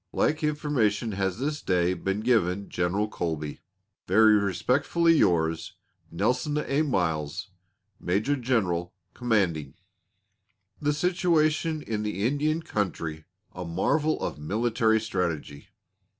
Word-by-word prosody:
Like 155 Hz, +1 st, 0 dB
information 140 Hz, -8 st, 0 dB
has 95 Hz, -1 st, -1 dB
this 145 Hz, +4 st, -2 dB
day 90 Hz, -1 st, +1 dB
been 95 Hz, +2 st, -2 dB
given 100 Hz, -5 st, +1 dB
General 90 Hz, +4 st, 0 dB
Colby. 80 Hz, -7 st, -4 dB, 0.5 s
Very 110 Hz, +3 st, +6 dB
respectfully 130 Hz, -, +2 dB
yours, 85 Hz, -, +1 dB, 0.4 s
Nelson 125 Hz, -, 0 dB
A. 150 Hz, -1 st, 0 dB
Miles 90 Hz, -, -1 dB, 0.5 s
Major 105 Hz, +11 st, 0 dB
General 95 Hz, -10 st, -1 dB, 0.2 s
Commanding 95 Hz, -, 0 dB, 0.5 s
] -, -, -42 dB
THE 150 Hz, 0 st, +1 dB
SITUATION 160 Hz, -2 st, +1 dB
IN 110 Hz, -2 st, -3 dB
THE 105 Hz, -1 st, -2 dB
INDIAN 150 Hz, +5 st, 0 dB
COUNTRY 80 Hz, -, -3 dB, 0.3 s
A 90 Hz, -, -6 dB
MARVEL 145 Hz, -, 0 dB
OF -, -, -3 dB
MILITARY 110 Hz, +6 st, +1 dB
STRATEGY. 85 Hz, -9 st, -3 dB
105 Hz, 110 wpm, -27 LUFS, 90-145 Hz, 0.5 s, Very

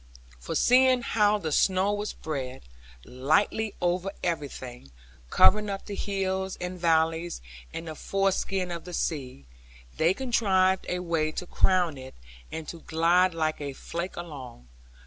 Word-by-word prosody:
For -, -, -5 dB
seeing 255 Hz, 0 st, +5 dB
how 210 Hz, -2 st, +3 dB
the 160 Hz, -6 st, -4 dB
snow 190 Hz, +5 st, +3 dB
was 205 Hz, +1 st, -2 dB
spread, 135 Hz, -4 st, -5 dB, 0.4 s
lightly 155 Hz, -, +1 dB
over 180 Hz, +2 st, 0 dB
everything, 130 Hz, -, -4 dB, 0.4 s
covering 210 Hz, +1 st, +5 dB
up 195 Hz, -1 st, -4 dB
the 205 Hz, -, -6 dB
hills 190 Hz, -1 st, -2 dB
and 180 Hz, 0 st, -5 dB
valleys, 165 Hz, 0 st, +1 dB, 0.3 s
and 165 Hz, -, -6 dB
the 160 Hz, -, -4 dB
foreskin 195 Hz, +1 st, -1 dB
of 170 Hz, -1 st, -6 dB
the 180 Hz, -, -8 dB
sea, 130 Hz, -, -3 dB, 0.5 s
they 170 Hz, +4 st, +3 dB
contrived 190 Hz, -7 st, +2 dB
a 180 Hz, -, 0 dB
way 165 Hz, -3 st, 0 dB
to -, -, -4 dB
crown 175 Hz, -5 st, +2 dB
it, 130 Hz, 0 st, -10 dB, 0.4 s
and 160 Hz, -1 st, -6 dB
to 170 Hz, -, -7 dB
glide 170 Hz, +3 st, +2 dB
like 155 Hz, -2 st, -1 dB
a 140 Hz, -1 st, -4 dB
flake 170 Hz, +6 st, -5 dB
along. 130 Hz, -, -9 dB
175 Hz, 145 wpm, -27 LUFS, 155-195 Hz, 0.5 s, seeing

